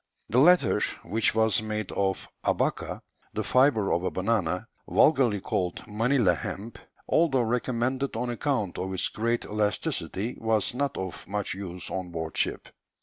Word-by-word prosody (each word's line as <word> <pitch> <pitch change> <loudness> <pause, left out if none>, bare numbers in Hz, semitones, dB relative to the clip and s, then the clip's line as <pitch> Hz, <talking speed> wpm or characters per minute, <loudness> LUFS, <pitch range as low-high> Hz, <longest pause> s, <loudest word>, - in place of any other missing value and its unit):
The 120 - +4
latter, 145 - +5 0.2
which 110 0 0
was 110 -2 +3
made 110 -2 -3
of 95 -1 -1 0.2
"abaca," - - -1 0.3
the - - -1
fibre 125 -6 +3
of 85 - 0
a 95 - +1
banana, 95 -3 0 0.2
vulgarly 130 -9 +4
called 90 -2 -2
"Manilla 115 -2 +2
hemp," 105 +6 -5 0.3
although 150 -6 +3
recommended 125 +3 -1
on 120 +2 -1
account 120 -6 -1
of 95 +1 -3
its 95 - +2
great 115 +2 -1
elasticity, 105 +1 -1
was 110 -2 +1
not 140 +2 -1
of 95 -1 -6
much 105 0 -1
use 90 -2 -6
on 95 -1 -3
board 80 -2 -5
ship. - - 0
110 Hz, 145 wpm, -27 LUFS, 95-125 Hz, 0.3 s, latter